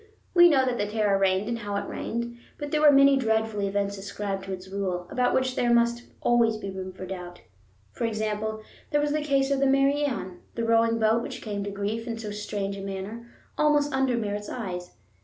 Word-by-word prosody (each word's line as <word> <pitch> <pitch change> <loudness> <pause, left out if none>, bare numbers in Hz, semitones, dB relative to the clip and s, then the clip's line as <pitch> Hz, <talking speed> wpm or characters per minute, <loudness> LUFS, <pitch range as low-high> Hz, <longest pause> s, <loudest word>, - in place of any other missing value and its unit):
We 345 -1 +8
know 270 -4 +4
that 250 -2 -1
the 205 - 0
terror 210 -2 +1
reigned, 195 +1 +2
and 235 0 -2
how 205 -2 -4
it 200 - -2
reigned, 235 +1 -4 0.2
but 290 0 -5
there 305 - +1
were 300 -1 +8
many 275 0 +6
dreadful 220 -3 0
events 200 0 -1
ascribed 195 0 -4
to 195 - -6
its 185 0 -6
rule 190 -2 -3
about 250 -1 +2
which 260 -1 +1
there 240 -1 +2
must 235 0 +2 0.2
always 235 -2 +3
be 200 -2 -5
room 190 0 -6
for 185 0 -8
doubt. 180 -2 -7 0.5
For 235 - -3
example, 215 0 -2 0.3
there 295 - +2
was 295 0 +1
the 305 +1 0
case 275 -2 +1
of 275 - +2
the 275 - +3
Mary 275 +2 +3
Ann, 190 -10 -3 0.2
the 230 - -1
rowing 230 0 +3
boat 225 +1 +3
which - - -7
came 205 -2 -3
to - - -3
grief 205 +3 -3
in 230 -1 -3
so 215 -2 -5
strange 205 -1 -3
a - - -6
manner, 195 +4 -6 0.3
almost 295 -1 +3
under 265 -2 +2
Merritt's 210 -2 -3
eyes. 180 -7 -5
220 Hz, 215 wpm, -26 LUFS, 200-255 Hz, 0.5 s, We